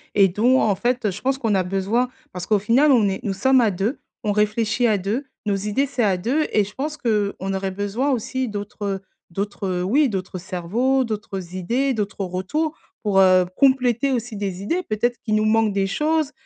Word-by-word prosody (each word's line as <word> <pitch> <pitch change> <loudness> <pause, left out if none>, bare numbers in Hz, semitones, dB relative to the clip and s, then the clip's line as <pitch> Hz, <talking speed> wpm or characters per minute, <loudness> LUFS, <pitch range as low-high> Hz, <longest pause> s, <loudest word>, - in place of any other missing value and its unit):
et 195 -2 +6
dont 240 +8 +3
en 205 -3 +2
fait, 245 +1 0
je 185 - -8
pense 270 +1 0
qu'on 225 -6 0
a 190 - +2
besoin, 195 +7 0 0.2
parce 180 -1 -6
qu'au 210 +1 +2
final 245 +9 +4
on 225 -5 +4
est 190 - -3
nous 200 - -1
sommes 260 +7 +3
à 225 - +3
2 200 +8 -2 0.3
on 210 - +2
réfléchit 215 +3 +1
à 215 -2 +3
2 210 +9 -2 0.2
nos 205 -1 +1
idées 210 +7 0
c'est 255 -3 -1
à 200 -3 +3
2 260 - 0
et 210 - +4
je 205 +1 -9
pense 295 +5 -3
qu'on 205 -6 -1
aurait 190 0 -2
besoin 205 +8 -1
aussi 260 +1 -2
d'autres, 205 -1 -6
heu, 195 -1 -1 0.3
d'autres, 200 +2 -3
heu 180 -1 -1
oui 275 +11 +3
d'autres 190 -4 -4
cerveaux, 200 +10 0
d'autres 200 -5 -5
idées, 245 +9 0
d'autres 210 -3 -3
retours 195 - -2 0.2
pour, 200 -3 +2
heu, 185 -1 +6
compléter 260 -1 +3
aussi 235 -3 -3
des 195 -2 -4
idées. 340 - 0
Peut-être 240 - -1
qu'il 215 -2 +1
nous 215 - +2
manque 215 -1 +2
des 195 0 +1
choses, 305 +7 0
210 Hz, 210 wpm, -22 LUFS, 195-250 Hz, 0.3 s, et